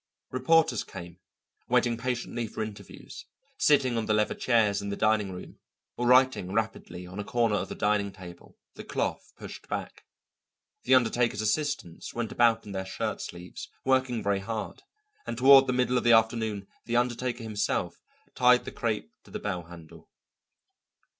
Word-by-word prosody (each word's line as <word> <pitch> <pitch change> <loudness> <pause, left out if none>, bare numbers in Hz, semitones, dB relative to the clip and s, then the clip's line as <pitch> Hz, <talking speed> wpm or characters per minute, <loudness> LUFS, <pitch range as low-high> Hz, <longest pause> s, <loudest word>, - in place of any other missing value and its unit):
Reporters 130 -1 +3
came, 85 0 -10 0.5
waiting 120 -1 +3
patiently 120 -1 -3
for 110 - -4
interviews, 105 -1 -10 0.3
sitting 130 -5 +3
on 110 - -2
the 110 - +2
leather 105 0 +1
chairs 110 -5 +2
in 100 - -5
the 100 - -2
dining 105 -2 +1
room, 90 0 -10 0.4
or 120 - -1
writing 125 -7 +4
rapidly 110 -4 -3
on 90 +3 -9
a - - -2
corner 115 0 +1
of - - -3
the - - -5
dining 105 -1 +1
table, 90 -2 -13 0.2
the - - -9
cloth - - -3
pushed - - -10
back. - - -5 0.8
The 130 - +6
undertaker's 120 -3 +2
assistants 125 - -2
went 115 -2 -3
about 115 -1 +3
in 105 - -8
their 95 -1 -3
shirt 95 - -4
sleeves, 90 +1 -8 0.2
working 130 -3 +1
very 100 -1 +1
hard, 110 +2 -5 0.5
and - - -4
toward 135 +1 +8
the - - +1
middle 125 0 +2
of - - -6
the 120 - +5
afternoon 110 -3 +2 0.2
the 120 - -2
undertaker 120 0 -1
himself 105 -2 -2 0.3
tied 125 0 +4
the - - -6
crêpe 110 -3 -3
to - - -17
the - - -5
bell 90 -5 -4
handle. 85 -2 -14
115 Hz, 165 wpm, -28 LUFS, 100-125 Hz, 0.8 s, toward